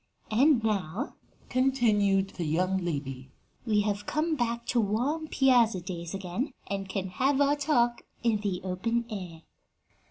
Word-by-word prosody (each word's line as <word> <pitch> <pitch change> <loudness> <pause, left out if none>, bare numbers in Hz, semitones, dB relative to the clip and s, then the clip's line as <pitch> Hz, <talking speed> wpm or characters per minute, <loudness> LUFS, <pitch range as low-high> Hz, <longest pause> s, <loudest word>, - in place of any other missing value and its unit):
And 255 +2 +4
now," 210 - -1 0.3
continued 215 -7 +2
the 170 - -4
young 185 +5 +1
lady, 140 -6 -4 0.4
"we 210 -2 +3
have 205 0 -2
come 315 +1 0
back 235 -3 -1
to 240 - +3
warm 255 +10 -1
piazza 245 -9 +4
days 170 0 -6
again, 195 +9 -3
and 195 -1 -4
can 190 -1 -3
have 265 +9 +1
our 285 0 +4
talk 260 -5 +1 0.2
in 230 -2 +3
the 200 -3 -2
open 230 +6 -1
air." 175 -6 -6
210 Hz, 145 wpm, -28 LUFS, 185-250 Hz, 0.4 s, And